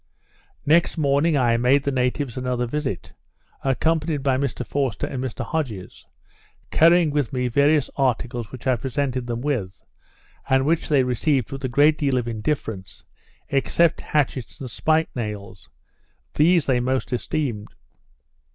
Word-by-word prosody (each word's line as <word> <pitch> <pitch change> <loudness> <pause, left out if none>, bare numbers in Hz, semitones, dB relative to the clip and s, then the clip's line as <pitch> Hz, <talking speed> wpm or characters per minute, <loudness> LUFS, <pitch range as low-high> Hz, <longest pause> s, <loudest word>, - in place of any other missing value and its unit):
Next 165 +4 +3
morning, 145 +1 +2
I 120 -3 +3
made 130 +4 +3
the 140 - 0
natives 125 0 -1
another 125 -1 -1
visit, 130 - -4 0.5
accompanied 150 +2 0
by 135 -1 +2
Mr 130 -2 -2
Forster 135 -5 -1
and 130 -1 -4
Mr 130 - -4
Hodges, 120 - -5 0.6
carrying 170 -1 +5
with 145 -4 -1
me 125 -2 -1
various 140 +3 +3
articles 120 -3 -1
which 130 - -10
I 130 -2 +2
presented 130 0 -2
them 120 0 -3
with, 120 -10 -2 0.7
and 130 0 +3
which 160 +2 0
they 140 -4 +4
received 125 0 0
with 135 0 -6
a - - -1
great 145 +4 +4
deal 140 -3 +1
of 120 -1 -1
indifference, 110 -4 -4 0.4
except 155 +4 +2
hatchets 140 -3 -2
and 130 -4 -7
spike 160 +6 +1
nails; 105 -5 -6 0.6
these 165 +1 +4
they 130 -2 +2
most 130 +1 -1
esteemed. 120 -4 -2
130 Hz, 140 wpm, -23 LUFS, 120-150 Hz, 0.7 s, carrying